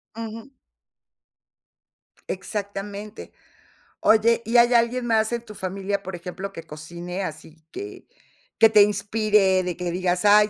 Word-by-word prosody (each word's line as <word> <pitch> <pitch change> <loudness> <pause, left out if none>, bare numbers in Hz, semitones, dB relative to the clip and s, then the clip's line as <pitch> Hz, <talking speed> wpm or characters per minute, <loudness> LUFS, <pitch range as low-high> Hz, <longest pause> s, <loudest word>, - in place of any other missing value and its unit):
Ujú. 230 +3 -7 1.8
Exactamente. 200 +1 -6 0.7
Oye, 225 +2 +4
¿y 235 +2 +2
hay 240 +1 +6
alguien 240 +1 +2
más 220 -1 +2
en 235 - -1
tu 215 - -10
familia, 195 +1 -3
por 190 -1 -6
ejemplo, 180 +3 -6
que 165 - -8
cocine 170 +4 -6
así 160 -1 -8
que 405 +1 -8 0.5
que 225 - +8
te 215 -1 +7
inspire, 205 -2 +2
de 180 -1 -3
que 180 -1 -3
digas: 180 +1 0
"Ay 210 +1 +6
205 Hz, 130 wpm, -24 LUFS, 185-220 Hz, 1.8 s, que